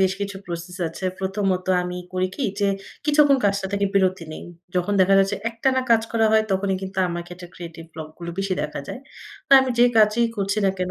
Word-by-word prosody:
বেশ 190 Hz, 0 st, +3 dB
কিছু 200 Hz, -1 st, -3 dB
প্রসেস 170 Hz, +1 st, -6 dB
আছে। 165 Hz, +3 st, -8 dB
প্রথমত 190 Hz, -1 st, -1 dB, 0.2 s
আমি 180 Hz, 0 st, -4 dB, 0.2 s
করি 185 Hz, 0 st, 0 dB
কি -, -, -4 dB, 0.2 s
যে 200 Hz, -, +3 dB, 0.4 s
কিছুক্ষণ 290 Hz, -2 st, +4 dB
কাজটা 200 Hz, -1 st, +1 dB
থেকে 200 Hz, 0 st, +1 dB
বিরতি 185 Hz, -3 st, +2 dB
নেই। -, -, -8 dB, 0.3 s
যখন 180 Hz, +3 st, 0 dB
দেখা 190 Hz, +1 st, +5 dB
যাচ্ছে 195 Hz, +1 st, +2 dB
একটানা 260 Hz, +3 st, +1 dB
কাজ 225 Hz, -1 st, +5 dB
করা 225 Hz, -1 st, +3 dB
হয় 220 Hz, 0 st, +5 dB
তখনই 190 Hz, 0 st, 0 dB
কিন্তু 190 Hz, 0 st, -5 dB
আমাকে 175 Hz, 0 st, -5 dB
একটা 175 Hz, 0 st, -11 dB
ক্রিয়েটিভ 165 Hz, -1 st, -9 dB
ব্লক 155 Hz, -1 st, -7 dB
গুলো 170 Hz, -1 st, -6 dB
বেশি 195 Hz, -1 st, -1 dB
দেখা 150 Hz, -1 st, -4 dB
যায়। -, -, -5 dB, 0.5 s
তো -, -, -48 dB
আমি 265 Hz, -1 st, -1 dB
যে 240 Hz, -, +7 dB
কাজই 215 Hz, +2 st, +4 dB
করছি 200 Hz, +1 st, -1 dB
না 195 Hz, -, +4 dB
কেন 180 Hz, 0 st, -2 dB
195 Hz, 210 wpm, -23 LUFS, 180-210 Hz, 0.5 s, যে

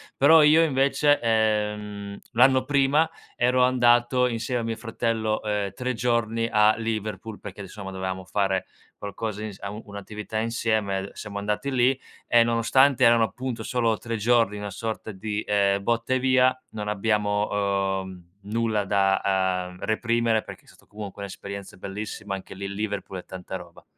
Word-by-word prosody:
Però 155 Hz, +3 st, +7 dB
io 155 Hz, +2 st, +6 dB
invece, 140 Hz, 0 st, +3 dB
ehm, 105 Hz, -2 st, 0 dB
l'anno 130 Hz, +2 st, +5 dB
prima, 145 Hz, +3 st, +3 dB, 0.3 s
ero 125 Hz, +1 st, +3 dB
andato 125 Hz, 0 st, +3 dB
insieme 120 Hz, +1 st, -2 dB
a -, -, -4 dB
mio 115 Hz, 0 st, -3 dB
fratello, 115 Hz, -1 st, -1 dB
uhm, 105 Hz, -2 st, -1 dB
3 125 Hz, 0 st, -2 dB
giorni 115 Hz, -1 st, 0 dB
a 105 Hz, 0 st, +4 dB
Liverpool, 110 Hz, -1 st, -4 dB
perché 100 Hz, 0 st, -9 dB
insomma 100 Hz, 0 st, -7 dB
dovevamo 95 Hz, 0 st, -4 dB
fare 95 Hz, 0 st, 0 dB, 0.3 s
qualcosa 105 Hz, +1 st, -5 dB
ins 105 Hz, -3 st, -7 dB
au 100 Hz, +2 st, -6 dB
un'attività 105 Hz, +2 st, -6 dB
insieme, 110 Hz, -4 st, -1 dB
siamo 100 Hz, -2 st, -7 dB
andati 105 Hz, +6 st, -2 dB
lì 130 Hz, 0 st, +2 dB, 0.3 s
e 120 Hz, -1 st, +6 dB
nonostante 125 Hz, +3 st, +3 dB
erano 115 Hz, -1 st, +6 dB
appunto 120 Hz, +2 st, -5 dB
solo 115 Hz, -1 st, +1 dB
3 115 Hz, +1 st, -4 dB
giorni, 115 Hz, -1 st, +2 dB
una 105 Hz, -1 st, -5 dB
sorta 110 Hz, +2 st, -5 dB
di, 105 Hz, +2 st, -4 dB
ehm, 100 Hz, -1 st, +2 dB
botta 120 Hz, +3 st, 0 dB
e 130 Hz, -, +2 dB
via, 130 Hz, 0 st, +3 dB
non 105 Hz, -1 st, -6 dB
abbiamo, 105 Hz, -2 st, 0 dB
uhm, 90 Hz, -1 st, -12 dB
nulla 110 Hz, -1 st, 0 dB
da, 95 Hz, -2 st, +1 dB
uhm, 90 Hz, -, -13 dB
reprimere 115 Hz, 0 st, +1 dB
perché -, -, -11 dB
è -, -, -28 dB
stato -, -, -21 dB
comunque 100 Hz, -1 st, -8 dB
un'esperienza 100 Hz, 0 st, -7 dB
bellissima, 100 Hz, +1 st, -6 dB
anche 95 Hz, 0 st, -7 dB
lì 100 Hz, +1 st, -5 dB
Liverpool 100 Hz, -2 st, -4 dB
è -, -, -12 dB
tanta 95 Hz, 0 st, -7 dB
roba. 85 Hz, -2 st, -14 dB
110 Hz, 155 wpm, -25 LUFS, 100-120 Hz, 0.3 s, Però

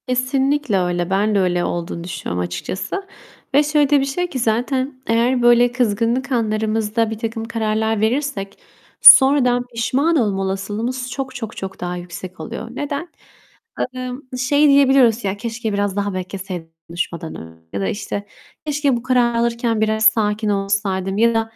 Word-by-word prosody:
Kesinlikle 265 Hz, -1 st, +1 dB
öyle. 175 Hz, -1 st, -1 dB
Ben 205 Hz, +2 st, +1 dB
de -, -, +3 dB
öyle 180 Hz, -2 st, +1 dB
olduğunu 170 Hz, -1 st, -4 dB
düşünüyorum 90 Hz, -, -4 dB
açıkçası. 185 Hz, -, -5 dB, 0.5 s
Ve 290 Hz, -, +6 dB
şöyle 295 Hz, -1 st, +2 dB
de 290 Hz, -1 st, +5 dB
bir 270 Hz, -, 0 dB
şey 355 Hz, +6 st, -2 dB
ki, 260 Hz, -, -4 dB
zaten 255 Hz, +4 st, -1 dB
eğer 240 Hz, +3 st, +2 dB
böyle 240 Hz, 0 st, +5 dB
kızgınlık 240 Hz, +2 st, 0 dB
anlarımızda 220 Hz, -1 st, 0 dB
birtakım 225 Hz, +1 st, -4 dB
kararlar 220 Hz, -1 st, -1 dB
verirsek 225 Hz, -4 st, -2 dB, 0.4 s
sonradan 260 Hz, -3 st, +8 dB
pişman 270 Hz, +8 st, +1 dB
olma 205 Hz, -8 st, +1 dB
olasılığımız 215 Hz, +7 st, -3 dB
çok, 260 Hz, +1 st, -5 dB
çok, 225 Hz, -2 st, -6 dB
çok 190 Hz, 0 st, -6 dB
daha 180 Hz, 0 st, -3 dB
yüksek 180 Hz, +1 st, -9 dB
oluyor. 230 Hz, 0 st, -6 dB
Neden? 290 Hz, +6 st, -4 dB, 0.8 s
Imm, 255 Hz, 0 st, -5 dB, 0.2 s
şey 285 Hz, +4 st, +3 dB
diyebiliyoruz: 270 Hz, -5 st, +4 dB
"Ya 195 Hz, 0 st, -2 dB
keşke 225 Hz, 0 st, -4 dB
biraz 200 Hz, -1 st, -1 dB
daha 205 Hz, -1 st, -1 dB
bekleseydim 185 Hz, -2 st, -6 dB, 0.2 s
konuşmadan 170 Hz, -1 st, -4 dB
önce." 80 Hz, 0 st, -12 dB
ya 100 Hz, -, -2 dB
da, 95 Hz, -, -1 dB
işte, 205 Hz, -1 st, -4 dB, 0.4 s
"Keşke 290 Hz, -3 st, +1 dB
bu 235 Hz, -, -8 dB
kararı 245 Hz, -2 st, +2 dB
alırken 235 Hz, -1 st, 0 dB
biraz 220 Hz, 0 st, +1 dB
sakin 215 Hz, -1 st, +2 dB
olsaydım." 195 Hz, -1 st, -1 dB
ya 230 Hz, +2 st, +4 dB
da, 225 Hz, -, +2 dB
225 Hz, 155 wpm, -20 LUFS, 195-255 Hz, 0.8 s, sonradan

